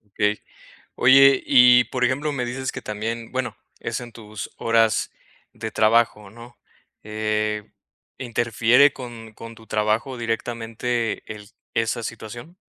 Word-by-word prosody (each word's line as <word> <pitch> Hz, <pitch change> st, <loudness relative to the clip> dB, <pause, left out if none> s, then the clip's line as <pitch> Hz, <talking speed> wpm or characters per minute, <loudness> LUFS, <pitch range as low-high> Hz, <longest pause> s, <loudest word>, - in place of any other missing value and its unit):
Okey, 105 Hz, 0 st, 0 dB, 0.5 s
oye, 135 Hz, +1 st, +6 dB
y, 125 Hz, -2 st, +7 dB
por 125 Hz, -1 st, -2 dB
ejemplo, 140 Hz, +4 st, 0 dB
me 125 Hz, -3 st, -2 dB
dices 130 Hz, +2 st, -4 dB
que -, -, -7 dB
también, 115 Hz, +2 st, -5 dB
bueno, 130 Hz, -1 st, -3 dB, 0.2 s
es, -, -, -3 dB
en 120 Hz, -1 st, -9 dB
tus 110 Hz, -2 st, -8 dB
horas 115 Hz, -2 st, +1 dB, 0.4 s
de 110 Hz, -, -6 dB
trabajo, 110 Hz, -2 st, +2 dB
¿no?, 120 Hz, +2 st, -14 dB, 0.5 s
eh, 105 Hz, 0 st, -2 dB, 0.5 s
¿interfiere 120 Hz, +3 st, +3 dB
con 115 Hz, -4 st, -10 dB
con 115 Hz, 0 st, -10 dB
tu 110 Hz, 0 st, -17 dB
trabajo 110 Hz, +4 st, -1 dB
directamente 115 Hz, 0 st, -3 dB
el 105 Hz, -1 st, -12 dB, 0.3 s
esa 115 Hz, +1 st, 0 dB
situación? 120 Hz, +9 st, -8 dB
115 Hz, 130 wpm, -23 LUFS, 110-125 Hz, 0.5 s, y